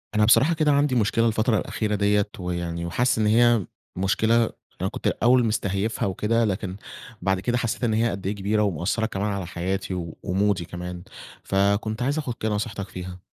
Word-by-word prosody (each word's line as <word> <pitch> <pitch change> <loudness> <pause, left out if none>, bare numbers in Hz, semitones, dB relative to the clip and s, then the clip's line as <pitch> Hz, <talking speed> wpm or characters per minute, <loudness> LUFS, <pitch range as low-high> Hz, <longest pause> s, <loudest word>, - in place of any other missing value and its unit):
أنا 105 - +4
بصراحة 135 +8 +5
كده 155 -2 +2
عندي 140 -2 +2
مشكلة 115 0 +2
الفترة 110 +1 +2
الأخيرة 105 0 -2
ديّة 100 0 +2
ويعني 85 -1 -3
وحاسس 120 +9 +1
إن 110 - +2
هي 115 -2 +4 0.3
مشكلة 110 +5 +2 0.3
أنا - - 0
كنت - - -4
الأوّل 125 0 +3
مستهيفها 105 -1 -1
وكده، 115 +4 +1
لكن 95 -2 -2 0.5
بعد 95 +1 +1
كده 120 +5 0
حسّيت 120 0 -2
إن 115 - +2
هي 115 +2 +2
قد 95 -3 -4
إيه 100 - -1
كبيرة 100 +2 0
ومأثّرة 100 +4 0
كمان 105 -1 -2
على 100 -2 -3
حياتي 95 +2 -3 0.3
ومودي 95 -1 +1
كمان 90 +1 -7 0.4
فكنت 100 +3 +1
عايز 140 +5 0
آخد 140 -6 -2
كده 110 - -2
نصيحتك 105 -2 -3
فيها. 90 0 -7
105 Hz, 175 wpm, -24 LUFS, 95-115 Hz, 0.5 s, بصراحة